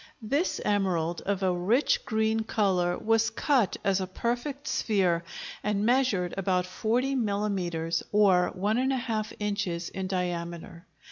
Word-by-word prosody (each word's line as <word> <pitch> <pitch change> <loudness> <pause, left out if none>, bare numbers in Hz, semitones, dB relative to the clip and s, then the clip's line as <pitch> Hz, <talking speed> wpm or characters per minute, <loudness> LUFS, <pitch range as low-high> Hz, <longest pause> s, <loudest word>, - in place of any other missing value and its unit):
This 285 +11 0
emerald, 180 -5 0
of 200 -1 0
a 185 -1 +2
rich 210 +11 +1
green 220 0 +1
color, 190 -5 +1
was 225 0 +2
cut 260 -9 +1
as 195 -1 +2
a 185 - -3
perfect 245 +9 -3
sphere 180 -6 +1 0.4
and 210 0 0
measured 235 -8 +2
about 185 -1 +1
40 230 +8 0
millimetres, 195 -8 -1
or 195 -4 +4
1½ 225 +1 0
inches, 190 -5 -2
in 190 0 -4
diameter. 170 -2 -4
200 Hz, 125 wpm, -28 LUFS, 180-225 Hz, 0.4 s, or